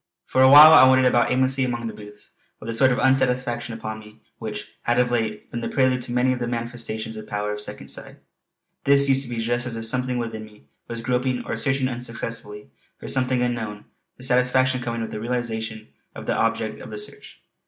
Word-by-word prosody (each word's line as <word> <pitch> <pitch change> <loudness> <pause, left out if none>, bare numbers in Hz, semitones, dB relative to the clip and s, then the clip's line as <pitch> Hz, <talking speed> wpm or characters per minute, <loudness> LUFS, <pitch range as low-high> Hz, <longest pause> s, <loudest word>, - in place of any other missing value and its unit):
For 130 - +1
awhile 145 +4 +10
I 130 -4 +9
wandered 130 0 +4
about 120 -2 +3
aimlessly 130 +1 +1
amongst 120 -2 -2
the 110 - -6
booths, 105 0 -13 0.3
with - - -11
that 115 - -3
sort 130 +3 +5
of 125 - 0
unsatisfaction 125 -3 +1
upon 110 -1 -6
me 105 0 -15 0.2
which 105 -2 -6
had 120 +1 0
of 125 0 +2
late 110 -3 -2
been 120 - -4
the - - -3
prelude 130 -1 +1
to 120 - -6
many 125 +1 +2
of 125 - -5
the 120 - -2
manifestations 115 -2 -4
of 110 - -8
the - - -20
power 105 0 -2
of 105 - -6
Second - - -7
Sight. - - -6 0.7
This 140 0 +4
used 135 0 +3
to - - -9
be 120 - -4
just 120 +2 0
as 120 - -5
if 115 0 -4
something 125 +2 -1
within 115 -2 -4
me 105 -9 -16 0.2
was 115 -1 -6
groping 125 +1 -1
or - - -3
searching 135 -2 0
unsuccessfully 115 - -6 0.3
for - - -9
something 130 -1 +1
unknown, 110 -4 -3 0.3
the 125 - -13
satisfaction 130 0 +2
coming 115 -1 -3
with 110 - -5
the 105 - -5
realization 110 -2 -4 0.3
of - - -8
the - - 0
objective - - -5
of - - -9
the - - -7
search. - - -8
120 Hz, 215 wpm, -23 LUFS, 110-130 Hz, 0.7 s, awhile